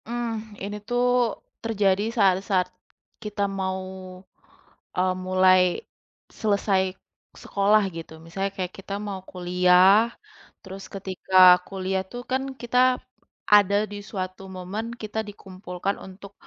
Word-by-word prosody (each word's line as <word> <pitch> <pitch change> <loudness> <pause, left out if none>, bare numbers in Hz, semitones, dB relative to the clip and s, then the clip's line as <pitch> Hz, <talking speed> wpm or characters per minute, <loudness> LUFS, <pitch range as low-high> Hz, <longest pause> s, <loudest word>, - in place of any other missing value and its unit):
Hmm, 225 -2 -4
ini 205 +1 -4
tuh 245 0 +1 0.6
terjadi 205 -3 +1
saat-saat 190 -2 +2 0.6
kita 210 -1 -4 0.2
mau, 190 0 -2 1.2
eee, 185 0 +2
mulai 185 0 +5 0.8
selesai 200 -2 +2 0.6
sekolah 205 +1 +3
gitu. 165 -1 -8
Misalnya 195 +4 -3
kayak 185 -1 -3
kita 195 +1 -7
mau 195 -2 -4
kuliah, 180 +2 +5 0.7
terus 190 0 -9
ketika 190 -1 -5 0.3
kuliah 190 0 -2
tuh 245 - -6
kan 260 +1 +1 0.2
kita 240 +1 -2 0.8
ada 200 -1 +5 0.2
di 205 - -6
suatu 185 -1 -5
momen 185 +5 -5 0.2
kita 215 0 -4
dikumpulkan 190 -1 -5
untuk, 195 +1 -12
195 Hz, 110 wpm, -25 LUFS, 185-210 Hz, 1.2 s, mulai